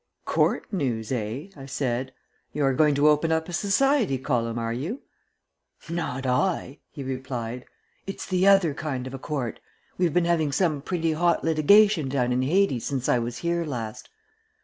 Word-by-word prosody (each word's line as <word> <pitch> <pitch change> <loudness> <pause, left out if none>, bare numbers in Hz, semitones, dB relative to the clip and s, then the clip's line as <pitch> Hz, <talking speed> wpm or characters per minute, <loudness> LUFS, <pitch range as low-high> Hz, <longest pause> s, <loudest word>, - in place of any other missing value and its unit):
"Court - - +1
news, 120 - -2
eh?" 125 - -3
I 135 -2 -10
said. 130 -1 -2 0.4
"You 145 -1 0
are 135 - +3
going 150 +2 +3
to 145 +2 +4
open 150 +2 +3
up 160 0 0
a 175 - -7
society 210 - +2
column, 120 -3 -1
are 115 0 -2
you?" 165 - -4 0.9
"Not 160 -6 -3
I," 135 +2 0
he 140 - -8
replied. 130 -2 -5 0.4
"It's 195 - -5
the 185 0 +1
other 195 -6 +5
kind 140 -4 -4
of 130 - -7
a 135 - -6
court. 135 -5 -4 0.4
We've 175 -3 +2
been 175 +2 +2
having 165 -4 +1
some 155 -5 +1
pretty 165 0 -1
hot 170 +2 +1
litigation 165 +1 +4
down 125 -2 0
in 125 - +1
Hades 145 - +2
since 135 -3 -2
I 125 - +3
was 120 +1 -4
here 170 0 -1
last. 115 -8 -6
145 Hz, 170 wpm, -25 LUFS, 125-170 Hz, 0.9 s, other